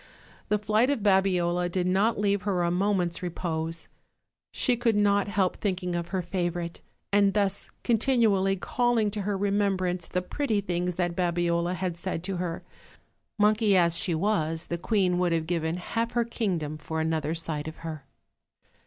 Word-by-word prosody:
The 210 - +3
flight 215 +4 +2
of 285 -6 0
Babiola 180 -3 +2
did 180 0 -1
not 195 +4 +2
leave 200 -1 +1
her 185 -3 0
a 170 - +1
moment's 180 -2 0
repose: 165 -2 -3 0.6
she 250 - +1
could 235 -2 +1
not 205 -1 +3
help 195 -2 0
thinking 180 -3 -2
of 170 -1 -2
her 185 0 -2
favorite, 175 -1 -3 0.3
and 200 -1 +4
thus 200 -1 0
continually 225 -5 +3
calling 230 +1 +1
to 210 0 -2
her 200 0 -1
remem 200 0 +1
brance 180 -2 -2
the 180 0 -1
pretty 225 0 -1
things 180 -2 -2
that 175 -1 -1
Babiola 175 0 0
had 180 -2 -3
said 175 -1 -4
to 190 0 -3
her; 175 -2 -3 0.7
monkey 210 -1 +4
as 170 -2 +3
she 170 0 0
was, 165 -3 0
the 170 - -1
queen 185 -2 +1
would 175 -2 +2
have 165 -1 0
given 165 0 -1
half 230 +6 -2
her 235 -1 +2
kingdom 175 -10 -2
for 160 +2 -4
another 160 -1 -1
sight 160 -2 -4
of 160 - -6
her. 155 -4 -6
185 Hz, 170 wpm, -27 LUFS, 170-205 Hz, 0.7 s, and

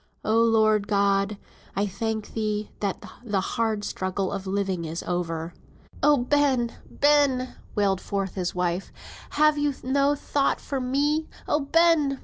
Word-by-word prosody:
"Oh 225 +1 +3
Lord 215 -2 +3
God! 200 0 +2 0.4
I 200 - +1
thank 215 +2 -3
thee, 215 -1 -2
that 200 -2 -3 0.2
the 210 -5 0
hard 220 +2 -1
struggle 190 -1 -2
of 195 -1 -4
living 190 -3 -1
is 165 +1 -4
over." 165 -1 -3 0.5
"Oh, 295 -1 +5
Ben! 260 -2 +2 0.2
Ben!" 285 -3 +2 0.2
wailed 195 -3 +1
forth 195 -2 -3
his 180 -2 -3
wife, 180 +1 -1 0.4
"have 305 0 +3
you 290 -1 0
no 280 +2 +2
thought 280 0 0
for 275 - -3
me? 290 +5 +1 0.2
Oh, 295 - +2
Ben! 300 -2 +3
220 Hz, 140 wpm, -25 LUFS, 195-275 Hz, 0.5 s, Oh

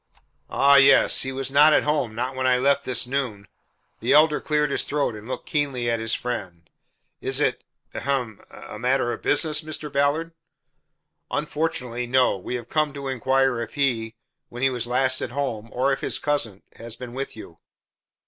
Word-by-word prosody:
"Ah, 140 0 +5
yes. 140 0 +6
He 130 - -1
was 135 0 -3
not 150 +2 +6
at - - +4
home 145 -7 -1
not 125 +3 -3
when 130 0 0
I 125 -1 +4
left 140 +2 +1
this 130 0 +3
noon." 120 -7 -3 0.5
The - - +1
Elder 150 0 +5
cleared 150 -1 0
his - - +1
throat 145 -4 -1
and 105 +1 -10
looked 130 - -5
keenly 135 -5 -1
at 115 - -1
his 115 0 0
friend. 95 -9 -5 0.5
"Is - - 0
it - - 0 0.3
ahem 125 -6 -3
a 105 - -10
matter 125 0 +1
of - - -8
business, 155 +1 +1
Mr. 155 -2 -7
Ballard?" 145 +4 0 1.0
"Unfortunately, 125 -6 -2
no. 130 -2 +3
We 95 +6 -5
have 120 -2 -6
come 155 -2 0
to 140 -1 -5
inquire 130 -1 +1
if 115 - -7
he 120 -5 0 0.3
when 120 +2 -7
he 135 - +3
was 120 -2 -2
last 130 +1 +2
at - - -3
home 120 -4 -4
or 135 +3 +1
if - - -3
his - - 0
cousin 115 -10 -2
has 115 0 -7
been 120 0 -9
with 135 +2 -5
you?" 85 -6 -12
130 Hz, 185 wpm, -24 LUFS, 120-140 Hz, 1.0 s, yes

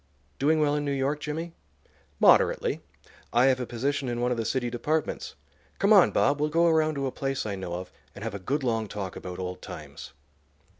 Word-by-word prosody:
"Doing 155 +3 +3
well 150 -1 +2
in 150 0 0
New 145 - -1
York, 140 +2 0
Jimmy?" 160 +3 -4 0.7
"Moderately. - - +4 0.5
I 120 +2 +4
have 130 -1 +3
a 125 - -3
position 135 +2 -1
in 120 0 -2
one 125 +1 +1
of 125 - 0
the 115 - -2
city 120 0 -1
departments. 150 +6 -2 0.4
Come 200 +2 +4
on, 195 -4 +7
Bob; 140 +1 +2
we'll 150 - +2
go 165 +3 +3
around 155 -2 +3
to 140 -1 -2
a 130 - -1
place 135 -2 -2
I 105 - -2
know 95 -3 -4
of, 90 +1 -7 0.2
and 105 - -8
have 115 -2 -3
a 100 - -5
good 135 +10 -2
long 115 -3 0
talk 100 -3 -5
about 90 -1 -7
old 90 -1 -5
times." - - -9
135 Hz, 210 wpm, -27 LUFS, 115-150 Hz, 0.7 s, on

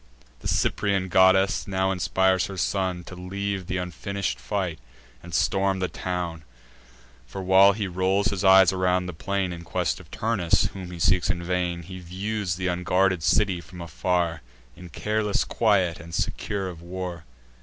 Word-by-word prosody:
The - - -6
Cyprian 100 -2 0
goddess 95 +2 +4
now 95 0 0
inspires 95 0 +2
her 95 - -8
son 90 0 -1
To 90 - -11
leave 95 +1 -4
th' 95 - -2
unfinish'd 90 -4 -3
fight, 85 +6 -3 0.4
and 85 - -11
storm 95 +4 +1
the 95 -1 -1
town: 90 -3 -4 0.8
For, 95 +10 -6
while 95 +2 +6
he 105 0 -3
rolls 95 +3 +1
his 100 -1 -3
eyes 95 -1 +7
around 90 0 +1
the 90 - -5
plain 95 +4 -2
In 85 0 -8
quest - - -1
of - - -15
Turnus, 105 -7 +1
whom 95 -2 -7
he 90 - -8
seeks 90 +2 +2
in 85 -3 -1
vain, 90 -1 -1
He 95 +2 -9
views 95 +1 -3
th' 95 - -9
unguarded 90 0 +1
city 95 +1 +2
from 90 0 -13
afar, 85 0 -1 0.3
In 90 -1 -11
careless 105 +4 0
quiet, 95 -7 +1
and 85 -1 -8
secure 100 -3 -2
of 85 -2 -8
war. 90 -1 -6
95 Hz, 165 wpm, -25 LUFS, 90-95 Hz, 0.8 s, eyes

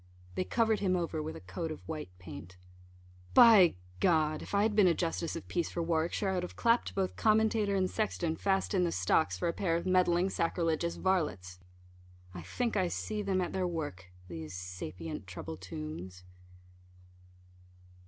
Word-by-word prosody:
They - - -1
covered 225 0 +2
him 185 -2 +1
over 165 -3 -2
with 155 +1 -5
a - - -7
coat 95 - -5
of 155 - -9
white 155 - -5
paint. 90 0 -10 0.8
By, 210 -7 +8 0.3
if 155 +1 +1
I 200 - +4
had 215 -1 +1
been 205 -3 +6
a 170 - +3
justice 165 -1 -2
of 165 - -7
peace 175 -2 -1
for 170 - -3
Warwickshire, 165 +4 0
I - - 0
would 180 - 0
have 180 - -7
clapt 235 0 +2
both 190 -2 -1
commentator 215 -2 +2
and 190 -1 +2
sexton 175 -6 -1
fast 195 +3 0
in 185 -2 +3
the 175 - +1
stocks, 95 0 +1
for - - -1
a 170 - 0
pair 165 -3 0
of 170 - -2
meddling 185 0 +3
sacrilegious 165 -1 0
varlets. 150 - -1 0.7
I 90 - -7
think 230 - -2
I 185 -3 +2
see 215 +4 -3
them 195 -2 0
at 175 - -3
their 185 -1 0
work 150 - -4 0.2
these 80 -1 -7
sapient 90 -2 -6
trouble - - -6
tombs. 90 +1 -7
170 Hz, 175 wpm, -31 LUFS, -, 0.8 s, By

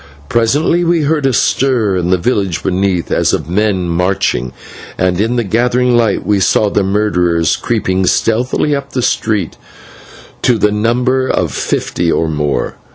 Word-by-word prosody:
Presently 145 +9 +1
we 170 -1 +1
heard 150 -1 +1
a - - +2
stir 120 -5 +1
in 90 -1 -1
the 95 - +3
village 95 -3 -1
beneath, 95 -1 -1
as - - +1
of - - -2
men 95 0 0
marching, 85 -8 -1 0.5
and 90 +1 0
in 115 +3 0
the 120 - 0
gathering 120 +4 +1
light 115 -4 +1
we 105 -1 +1
saw 100 +2 +2
the 100 - +1
murderers 90 -5 +1
creeping 95 -5 -1
stealthily 125 +8 +1
up 140 0 -6
the 125 - -1
street 105 -8 -1 0.8
to 120 - +2
the 105 -1 +2
number 125 +5 0
of - - 0
fifty 85 -1 -2
or 80 - 0
more. 75 -2 -2
105 Hz, 160 wpm, -14 LUFS, 90-125 Hz, 0.8 s, the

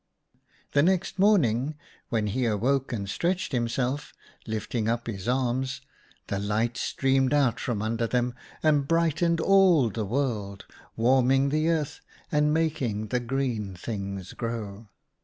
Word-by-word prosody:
" - - -37
The 140 - +5
next 185 +3 +1
morning, 155 - +3 0.3
when 115 -4 0
he 120 +5 -1
awoke 125 +6 +1
and 100 -5 -3
stretched 180 - -1
himself, 125 +3 -1 0.3
lifting 110 +1 -2
up 115 0 -1
his 105 -2 -5
arms, 130 +1 0 0.4
the 100 - -2
light 110 +4 0
streamed 135 +2 +1
out 135 -2 +2
from 115 -7 -2
under 115 +1 -1
them 125 +1 0 0.3
and 145 -3 +3
brightened 165 +1 +2
all 180 - +5
the 110 +2 -3
world, 105 -5 -2 0.3
warming 130 +3 +3
the 155 +3 +1
earth, 155 -4 -1 0.3
and 150 0 +3
making 130 -10 -1
the 125 - +1
green 120 -6 -2
things 100 -1 -5
grow. 110 -2 -5
125 Hz, 140 wpm, -27 LUFS, 110-145 Hz, 0.4 s, The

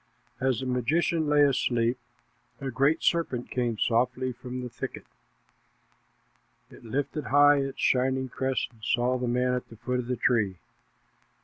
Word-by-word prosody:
As 130 -3 0
the - - -4
magician 150 +6 +1
lay 145 0 +5
asleep, 125 -3 +2 0.6
a 135 -1 -4
great 140 +6 +2
serpent 150 -8 0
came 120 -3 -1
softly 125 +3 +1
from 125 +1 -7
the - - -4
thicket. - - -7 1.7
It - - -15
lifted 140 +5 -3
high 145 +1 +6
its 135 -1 -3
shining 130 +1 +2
crest 130 +1 -2
and 110 -2 -23
saw 125 +2 +1
the 125 - -2
man 125 +1 +1
at 125 - -3
the 115 - -12
foot 125 +3 -2
of 120 - -4
the 125 - -1
tree. 110 -8 +1
125 Hz, 150 wpm, -27 LUFS, 120-135 Hz, 1.7 s, high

